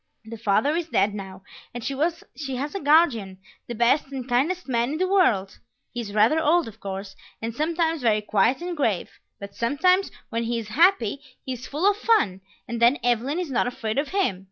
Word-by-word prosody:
The 225 +1 -8
father 225 +8 +2
is 340 -1 -2
dead 200 -5 +2
now, 190 -2 -8 0.3
and 240 - -5
she 275 - -3 0.6
has 285 +4 -4
a 395 - -3
guardian, 280 - +3 0.3
the 240 - -5
best 240 +6 +2
and 265 -2 -6
kindest 290 +9 0
man 240 +1 0
in - - -2
the 370 +2 +1
world; 235 - +2 0.3
he 240 - -3
is 210 -3 -7
rather 220 +9 +4
old 330 0 +2
of 220 0 -11
course, 195 0 -6 0.2
and 225 0 -4
sometimes 325 +3 0
very 215 -3 +2
quiet 220 - +1
and 350 0 -4
grave, 225 - -1 0.3
but 200 0 -9
sometimes 365 +11 +2 0.2
when 230 -1 -2
he 235 +1 -1
is 220 -2 -6
happy, 285 - +3 0.2
he 260 - -3
is 250 0 -8
full 310 +7 0
of 410 0 +3
fun, 415 - +2 0.3
and 235 -1 -4
then 240 +5 +5
Evelyn 245 +5 +1
is 355 -5 -3
not 245 - +1
afraid 235 -1 -2
of 290 - -1
him. 375 - 0
245 Hz, 205 wpm, -24 LUFS, 220-320 Hz, 0.6 s, then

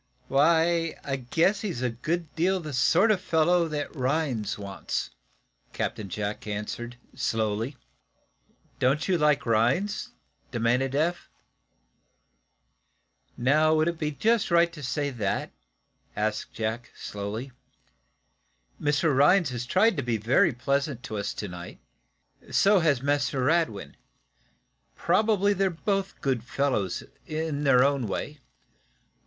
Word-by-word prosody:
"Why, 165 +3 +3
I 135 - -2
guess 165 - +1
he's 180 - -3
a 125 - 0
good 155 +7 -3
deal 185 +4 +2
the 155 -4 -7
sort 180 - +4
of 195 -3 +1
fellow 170 0 +2
that 150 -1 -4
Rhinds 130 -6 -1
wants," 100 -2 -4 0.6
Captain 105 -3 -3
Jack 105 +3 -4
answered, 110 +4 -5 0.2
slowly. 115 0 -1 1.0
"Don't 135 +4 +1
you 190 - +2
like 150 -3 +2
Rhinds?" 130 - +1 0.4
demanded 125 +3 0
Eph. 170 +4 0 2.1
"Now, 155 +5 +3
would 155 +1 +2
it 170 -1 -2
be 155 -2 0
just 220 +9 +1
right 170 0 +4
to 150 - -9
say 145 +2 -2
that?" 110 -6 -2 0.6
asked 105 0 -2
Jack, 115 +2 -3
slowly. 105 +6 -5 1.3
"Mr. 145 0 +2
Rhinds 150 +3 +4
has 120 -1 -4
tried 195 - +3
to - - +1
be 120 -3 -1
very 110 +5 +3
pleasant 140 +1 -1
to 110 -5 -5
us 100 - -2
to 105 - -4
night. 90 -1 -9 0.7
So 200 0 +4
has 150 -7 +2
Mr. 140 -2 0
Radwin. 155 - 0 1.0
Probably 205 -2 +2
they're 195 0 +1
both 195 +3 -2
good 130 -5 0
fellows, 125 -8 -1 0.2
in 155 -2 -2
their 130 -2 +6
own 140 -4 +1
way. 145 +9 -4
140 Hz, 125 wpm, -27 LUFS, 120-165 Hz, 2.1 s, their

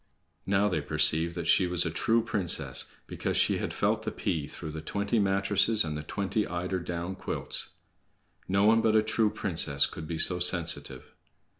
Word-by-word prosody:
Now 100 +1 +2
they 90 -6 -1
perceived 80 +3 +3
that 85 -2 -5
she 90 +2 +3
was 90 -1 0
a 80 - -2
true 115 +6 +1
princess, 95 -8 0
because - - -3
she - - +2
had - - -4
felt - - -1
the - - -4
pea 75 -4 -3
through 80 - -8
the 80 +1 -7
twenty 100 +7 -2
mattresses 100 +2 +2
and 75 -1 -4
the 75 - -5
twenty 100 +6 -3
eider 90 +2 -3
down 85 +1 -5
quilts. - - -3 0.8
No 100 +1 +1
one 115 +1 +4
but 110 -1 +1
a 110 - +4
true 110 -1 +1
princess 85 -9 +2
could 80 - -8
be 85 - -4
so 90 +2 +5
sensitive. 85 -2 0
90 Hz, 180 wpm, -28 LUFS, 85-105 Hz, 0.8 s, so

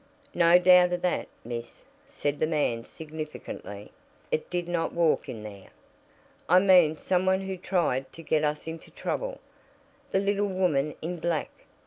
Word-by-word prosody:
"No 170 0 +6
doubt 180 0 +6
of 175 - -3
that, 180 - 0 0.2
miss," 120 0 -7 0.2
said 145 - -3
the 155 - +2
man 145 -7 0
significantly. 155 -10 -8 0.4
"It 155 - -1
did 175 -1 -2
not 175 -1 -1
walk 170 -2 +1
in 110 -3 -6
there." 100 -2 -10 0.8
"I 180 - +7
mean 180 -5 +5
some 185 +2 0
one 190 0 +3
who 190 0 -4
tried 170 -8 -1
to 165 - -11
get 155 0 +1
us 150 0 -1
into 160 0 -7
trouble. - - -4 0.7
The - - +1
little 200 +1 +1
woman 155 -6 0
in 175 +1 -4
black!" 165 -2 -1
170 Hz, 155 wpm, -27 LUFS, 150-180 Hz, 0.8 s, I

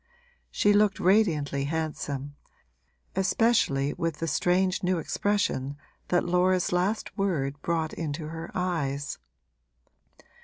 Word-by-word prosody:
She 205 - +3
looked 205 -1 +3
radiantly 160 -8 +2
handsome, 145 -2 -3 0.8
especially 190 -8 +2
with 165 -3 -2
the 165 - -2
strange 180 +4 +1
new 185 0 +1
expression 160 -6 -1 0.3
that 175 - +2
Laura's 180 +1 +2
last 185 +5 0
word 145 -8 -1
brought 165 -2 -1
into 155 -1 -4
her 165 +1 -6
eyes. 150 -6 -2
170 Hz, 105 wpm, -27 LUFS, 145-185 Hz, 0.8 s, She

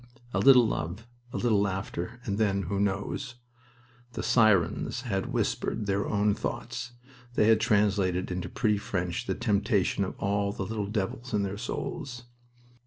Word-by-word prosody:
A - - +1
little 130 -4 +7
love, 85 +4 -3 0.3
a - - -3
little 110 -4 +2
laughter, 95 +2 -3
and 100 -1 -2
then 100 -2 +2
who 100 +3 -2
knows? 100 +4 -2 0.8
The - - -4
sirens 110 0 +3
had 100 -6 -2
whispered 105 - -1
their 100 0 0
own 105 0 +2
thoughts. 125 +4 -4 0.4
They - - +4
had 110 -1 +6
translated 100 -4 +2
into 90 0 -3
pretty 105 -3 +1
French 90 -3 -3
the - - 0
temptation 100 -1 +1
of 95 - -5
all 100 0 0
the 95 - -4
little 105 -1 -3
devils 105 +3 -3
in 100 - +2
their 100 0 -2
souls. 125 +1 -4
100 Hz, 155 wpm, -28 LUFS, 95-110 Hz, 0.8 s, little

